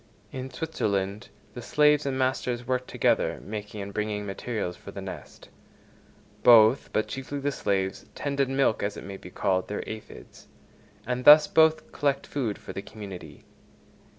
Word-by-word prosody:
In 130 Hz, 0 st, -6 dB
Switzerland 105 Hz, -, -2 dB, 0.2 s
the 120 Hz, -, -7 dB
slaves 150 Hz, +3 st, +3 dB
and 135 Hz, -1 st, -1 dB
masters 125 Hz, -2 st, -1 dB
work 125 Hz, 0 st, -1 dB
together, -, -, +1 dB
making 105 Hz, 0 st, -6 dB
and 100 Hz, 0 st, -8 dB
bringing 105 Hz, 0 st, -2 dB
materials 100 Hz, -2 st, -4 dB
for -, -, -12 dB
the -, -, -7 dB
nest: -, -, -9 dB, 0.9 s
both, 115 Hz, +2 st, +6 dB
but 110 Hz, -, 0 dB
chiefly 135 Hz, +2 st, -5 dB
the 140 Hz, +1 st, -1 dB
slaves, 95 Hz, -7 st, -2 dB
tend 140 Hz, -1 st, -3 dB
and 135 Hz, -1 st, +1 dB
milk 135 Hz, -5 st, +2 dB
as 100 Hz, +1 st, -2 dB
it -, -, -8 dB
may 100 Hz, 0 st, -7 dB
be 90 Hz, -, -11 dB
called, 95 Hz, -1 st, 0 dB
their 105 Hz, -, -5 dB
aphides; 110 Hz, -1 st, -10 dB, 0.6 s
and 125 Hz, 0 st, -2 dB
thus 150 Hz, +2 st, +9 dB
both 160 Hz, 0 st, +3 dB
collect 140 Hz, -2 st, 0 dB
food 120 Hz, -8 st, -3 dB
for -, -, -9 dB
the 100 Hz, -, -5 dB
community. 95 Hz, -9 st, -10 dB
120 Hz, 160 wpm, -27 LUFS, 100-135 Hz, 0.9 s, thus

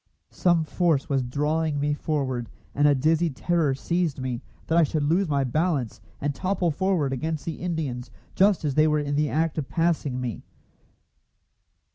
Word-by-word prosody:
Some 170 Hz, -3 st, +2 dB
force 160 Hz, -3 st, +1 dB
was 135 Hz, -2 st, +2 dB
drawing 150 Hz, +4 st, 0 dB
me 145 Hz, +1 st, +1 dB
forward, 135 Hz, -6 st, -2 dB, 0.2 s
and 145 Hz, +1 st, +3 dB
a 145 Hz, -, +5 dB
dizzy 160 Hz, +5 st, +2 dB
terror 155 Hz, 0 st, 0 dB
seized 170 Hz, 0 st, -1 dB
me 125 Hz, -2 st, -3 dB, 0.2 s
that 160 Hz, -, 0 dB
I -, -, +7 dB
should 155 Hz, -1 st, +1 dB
lose 170 Hz, +5 st, +2 dB
my 140 Hz, -2 st, +2 dB
balance, 140 Hz, -2 st, -1 dB, 0.2 s
and 145 Hz, 0 st, -1 dB
topple 180 Hz, 0 st, 0 dB
forward 170 Hz, -5 st, 0 dB
against 155 Hz, +3 st, -3 dB
the 165 Hz, -, -4 dB
Indians 145 Hz, -9 st, -3 dB, 0.2 s
just 195 Hz, -4 st, +3 dB
as 145 Hz, -, 0 dB
they 155 Hz, +3 st, +4 dB
were 150 Hz, 0 st, +2 dB
in 145 Hz, -1 st, -1 dB
the 150 Hz, 0 st, +1 dB
act 160 Hz, 0 st, 0 dB
of 140 Hz, -, -5 dB
passing 165 Hz, -6 st, 0 dB
me. 125 Hz, -3 st, -4 dB
150 Hz, 170 wpm, -25 LUFS, 140-165 Hz, 0.2 s, I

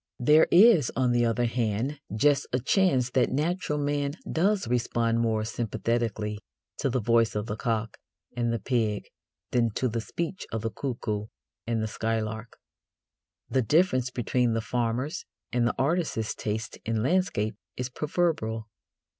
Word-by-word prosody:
There 150 Hz, +5 st, +5 dB
is, 180 Hz, -, +6 dB
on 125 Hz, 0 st, +2 dB
the 120 Hz, 0 st, +3 dB
other 115 Hz, +1 st, +1 dB
hand, 120 Hz, +4 st, -1 dB, 0.2 s
just 145 Hz, +5 st, +3 dB
a 125 Hz, -, +1 dB
chance 130 Hz, -, +2 dB
that 125 Hz, -1 st, +3 dB
natural 150 Hz, +2 st, -1 dB
man 145 Hz, 0 st, -1 dB, 0.2 s
does 190 Hz, -, +1 dB
respond 115 Hz, -1 st, +1 dB
more 110 Hz, -2 st, +1 dB
sympathetically 115 Hz, -2 st, -2 dB, 0.4 s
to 140 Hz, -, +1 dB
the 130 Hz, +1 st, 0 dB
voice 115 Hz, 0 st, +2 dB
of 105 Hz, 0 st, -1 dB
the 105 Hz, -2 st, -3 dB
cock 110 Hz, -1 st, -2 dB, 0.4 s
and 120 Hz, -1 st, 0 dB
the 115 Hz, -, 0 dB
pig 110 Hz, -3 st, 0 dB, 0.5 s
than 120 Hz, -2 st, +3 dB
to 130 Hz, -, +1 dB
the 115 Hz, -1 st, -2 dB
speech 170 Hz, -, -4 dB
of 110 Hz, -1 st, -3 dB
the 115 Hz, -, -1 dB
cuckoo 110 Hz, -4 st, -3 dB, 0.4 s
and 115 Hz, -2 st, 0 dB
the -, -, -1 dB
skylark. 110 Hz, 0 st, -3 dB, 0.9 s
The 130 Hz, -, +1 dB
difference 130 Hz, -, +2 dB
between 125 Hz, -1 st, 0 dB
the 115 Hz, -, +1 dB
farmer's 125 Hz, +6 st, -2 dB, 0.3 s
and 120 Hz, -1 st, +2 dB
the -, -, -1 dB
artist's 140 Hz, -7 st, 0 dB
taste 110 Hz, +1 st, -4 dB
in 110 Hz, 0 st, -1 dB
landscape 135 Hz, -, +1 dB, 0.2 s
is 125 Hz, 0 st, -3 dB
proverbial. 130 Hz, -7 st, -1 dB
120 Hz, 150 wpm, -27 LUFS, 110-140 Hz, 0.9 s, is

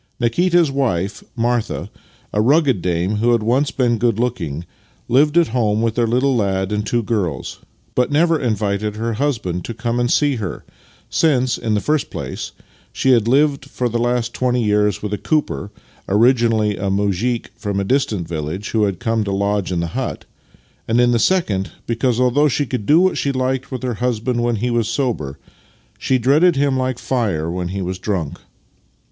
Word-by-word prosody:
Nikita's 170 Hz, +6 st, +2 dB
wife, 105 Hz, -8 st, -1 dB
Martha 120 Hz, -1 st, -1 dB, 0.2 s
— -, -, -32 dB
a 105 Hz, -, +2 dB
rugged 135 Hz, -, +3 dB
dame 90 Hz, +4 st, 0 dB
who 120 Hz, +3 st, +3 dB
had 115 Hz, -2 st, +1 dB
once 130 Hz, +6 st, +2 dB
been 120 Hz, -3 st, 0 dB
good 120 Hz, -3 st, +1 dB
looking 85 Hz, -, -2 dB, 0.2 s
— -, -, -35 dB
lived 150 Hz, +3 st, +4 dB
at 170 Hz, -2 st, +4 dB
home 110 Hz, -2 st, +1 dB
with 115 Hz, -1 st, +1 dB
their 120 Hz, 0 st, +1 dB
little 130 Hz, +3 st, +2 dB
lad 95 Hz, -3 st, 0 dB
and 105 Hz, 0 st, 0 dB
two 120 Hz, +2 st, 0 dB
girls, 95 Hz, -, -2 dB, 0.3 s
but 125 Hz, +3 st, +1 dB
never 165 Hz, +2 st, +3 dB
invited 105 Hz, -3 st, -1 dB
her 115 Hz, +1 st, -2 dB
husband 110 Hz, -9 st, -2 dB
to 115 Hz, -, -6 dB
come 115 Hz, +1 st, -2 dB
and 120 Hz, 0 st, +1 dB
see 145 Hz, -3 st, +2 dB
her; 95 Hz, -7 st, -5 dB, 0.5 s
since, 130 Hz, -6 st, +2 dB
in 110 Hz, -2 st, -1 dB
the -, -, +2 dB
first 150 Hz, +8 st, 0 dB
place, -, -, -5 dB, 0.4 s
she 130 Hz, -, +1 dB
had 115 Hz, -3 st, +3 dB
lived 140 Hz, +1 st, +2 dB
for 125 Hz, -2 st, -2 dB
the 120 Hz, 0 st, -2 dB
last 120 Hz, 0 st, 0 dB
twenty 125 Hz, -1 st, 0 dB
years 105 Hz, -1 st, +1 dB
with 105 Hz, -1 st, -3 dB
a 105 Hz, -, -2 dB
cooper 150 Hz, -9 st, -1 dB, 0.4 s
(originally 115 Hz, -1 st, +3 dB
a 100 Hz, +1 st, -2 dB
muzhik 100 Hz, +4 st, -1 dB
from 100 Hz, -2 st, -3 dB
a -, -, 0 dB
distant 105 Hz, -6 st, 0 dB
village 80 Hz, +5 st, -4 dB
who 110 Hz, -2 st, +2 dB
had 100 Hz, -2 st, -2 dB
come 115 Hz, -2 st, 0 dB
to 100 Hz, -, -3 dB
lodge 100 Hz, -1 st, 0 dB
in 85 Hz, -2 st, 0 dB
the 85 Hz, -, -2 dB
hut), -, -, -4 dB, 0.6 s
and, 115 Hz, +2 st, +2 dB
in 120 Hz, 0 st, +4 dB
the 120 Hz, -, +2 dB
second, 110 Hz, -, +1 dB
because, 120 Hz, +1 st, 0 dB
although 125 Hz, +4 st, +3 dB
she 145 Hz, +1 st, 0 dB
could 125 Hz, -6 st, -4 dB
do 155 Hz, +3 st, +6 dB
what 185 Hz, +1 st, +2 dB
she 140 Hz, -, 0 dB
hked 130 Hz, 0 st, -1 dB
with 130 Hz, -2 st, -5 dB
her 125 Hz, -1 st, -1 dB
husband 125 Hz, 0 st, 0 dB
when 120 Hz, 0 st, +1 dB
he 120 Hz, +3 st, -1 dB
was 120 Hz, -2 st, +1 dB
sober, 110 Hz, -, -2 dB, 0.6 s
she 130 Hz, -, +1 dB
dreaded 145 Hz, +8 st, +4 dB
him 140 Hz, -1 st, +1 dB
like 130 Hz, -1 st, -1 dB
fire 100 Hz, -13 st, -1 dB
when 90 Hz, 0 st, -3 dB
he 95 Hz, +1 st, -3 dB
was 90 Hz, +1 st, -4 dB
drunk. 90 Hz, -8 st, -3 dB
115 Hz, 190 wpm, -19 LUFS, 105-130 Hz, 0.6 s, do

